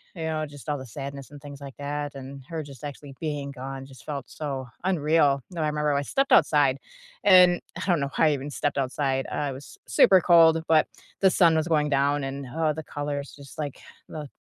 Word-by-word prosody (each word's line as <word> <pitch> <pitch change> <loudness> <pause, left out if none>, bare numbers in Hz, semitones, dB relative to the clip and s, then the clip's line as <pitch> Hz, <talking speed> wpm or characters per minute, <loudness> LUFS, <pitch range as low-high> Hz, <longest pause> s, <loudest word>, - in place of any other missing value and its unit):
you 165 - -5
know, 155 -1 -1
just 145 0 -13
all 150 -1 -1
the 130 - -8
sadness 140 +3 -7
and 145 - -11
things 145 -1 -10
like 140 -2 -9
that, 145 0 -4
and 135 0 -9
her 160 -2 -4
just 140 -4 -13
actually 145 -1 -8
being 145 -3 -3
gone 135 0 -7
just 135 -1 -15
felt 140 -5 -5
so 135 -4 -5 0.2
unreal. 155 -5 +2
Now, 170 -3 -4
I - - +1
remember 150 -1 0
I 140 - +1
stepped 275 - -1
outside, 145 -3 +4 0.5
and 180 -3 +6 0.2
I - - -4
don't 175 -4 +2
know 140 - -1
why 160 - +5
I - - +2
even 140 +1 -4
stepped 145 0 -2
outside, 135 0 -1
I 145 -2 -2
was 135 +2 -11
s 110 - -9
super 190 - +7
cold, 165 -2 +6
but 160 -1 +4 0.3
the 190 - +6
sun 170 -3 +4
was 160 +1 +1
going 150 -3 +2
down, 140 +1 +1
and, 135 +1 -5
huh, 155 +5 -1
the 160 +1 -6
colors 145 -1 -5
just 140 -1 -14
like 145 -3 -4 0.3
the 150 -2 -6
145 Hz, 220 wpm, -26 LUFS, 140-155 Hz, 0.5 s, super